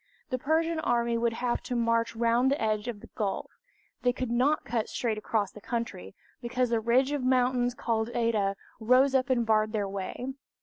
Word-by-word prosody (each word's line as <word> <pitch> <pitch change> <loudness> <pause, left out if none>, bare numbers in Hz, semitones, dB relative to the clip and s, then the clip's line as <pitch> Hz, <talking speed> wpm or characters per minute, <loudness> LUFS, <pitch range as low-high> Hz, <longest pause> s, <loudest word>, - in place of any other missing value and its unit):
The 255 - -1
Persian 320 +4 +1
army 235 -4 +1
would 230 0 +1
have 240 +1 -1
to 250 - -4
march 230 -1 +1
round 235 +3 +3
the 280 - +1
edge 215 0 0
of 220 -4 -5
the - - -13
gulf. 205 -3 -3 0.5
They 245 - +3
could 255 -1 -4
not 265 +6 +2
cut 225 -1 -1
straight 225 -3 -1
across 210 -2 -1
the 210 - -12
country, 230 - -4 0.3
because 250 0 -1
the 230 - +3
ridge 245 +5 +2
of 290 -2 -1
mountains 250 -1 +2
called 225 -1 -1
Oeta 215 -4 +1 0.2
rose 255 +4 +4
up 260 -1 +2
and 240 -3 +2
barred 215 0 +2
their 205 -2 0
way. 200 +7 -5
235 Hz, 190 wpm, -28 LUFS, 220-255 Hz, 0.5 s, rose